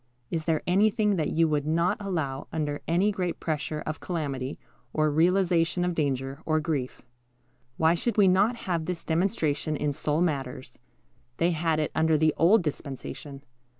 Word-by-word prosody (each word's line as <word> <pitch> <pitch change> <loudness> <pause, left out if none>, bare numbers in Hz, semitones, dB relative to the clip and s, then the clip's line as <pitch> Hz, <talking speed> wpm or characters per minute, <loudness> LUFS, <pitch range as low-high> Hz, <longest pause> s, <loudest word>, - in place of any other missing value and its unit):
Is 160 -2 -2
there 160 -2 0
anything 210 +3 +3
that 155 - 0
you 165 0 +2
would 150 -1 0
not 170 +3 +1
allow 160 -9 -3
under 150 -2 -2
any 180 +5 +2
great 180 -3 -3
pressure 155 -1 -3
of 155 0 -4
calamity, 140 -6 -3 0.4
or 155 -1 +2
realization 175 +1 +2
of 180 - 0
danger, 135 -3 -2
or 155 -1 +1
grief? 150 -5 -3 0.7
Why 160 +1 +4
should 225 +6 -1
we 200 -2 +6
not 200 +6 +3
have 170 -4 -1
this 180 -1 -4
demonstration 160 -4 0
in 145 0 -1
soul 150 +1 -1
matters? 135 -6 -3 0.6
They 170 +1 +2
had 160 -1 0
it 155 - -1
under 160 0 +3
the 155 0 +3
old 190 +4 +5
dispensation. 140 -1 -6
160 Hz, 160 wpm, -27 LUFS, 150-180 Hz, 0.7 s, we